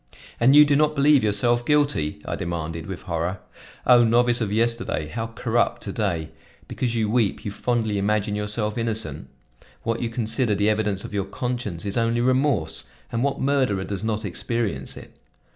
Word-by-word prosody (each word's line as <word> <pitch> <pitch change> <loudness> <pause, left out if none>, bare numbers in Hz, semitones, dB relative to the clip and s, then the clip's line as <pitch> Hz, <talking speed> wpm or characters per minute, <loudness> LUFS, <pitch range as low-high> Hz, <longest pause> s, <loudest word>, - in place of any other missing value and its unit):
"And 130 +4 +5
you 150 0 +9
do 145 -1 +2
not 150 +1 +2
believe 140 -2 +4
yourself 120 +3 +2
guilty?" 140 - +1
I - - -3
demanded 80 -1 -4
with 95 -2 -7
horror. 85 +1 -2 0.5
"O 125 -1 +7
novice 120 +1 +3
of 105 -3 -1
yesterday, 115 -7 0
how 115 +5 -3
corrupt 120 +1 -1
to 100 - -5
day! 85 -8 -2 0.4
Because 120 -2 -2
you 110 -2 +1
weep, 110 -2 0
you 100 - -2
fondly 110 -2 -1
imagine 105 +1 0
yourself 105 +1 -2
innocent? 115 -1 -2 0.6
What 115 0 -1
you 120 - -1
consider 115 -1 0
the 105 +2 +2
evidence 105 -2 -1
of - - -8
your 100 -2 -1
conscience 110 -5 -4
is 100 +3 -3
only 115 0 +1
remorse; 130 - +1 0.3
and 115 - -1
what 140 0 -1
murderer 130 -8 +1
does 100 +1 -4
not 110 -1 -2
experience 100 - -3
it? - - -12
110 Hz, 175 wpm, -24 LUFS, 100-120 Hz, 0.6 s, you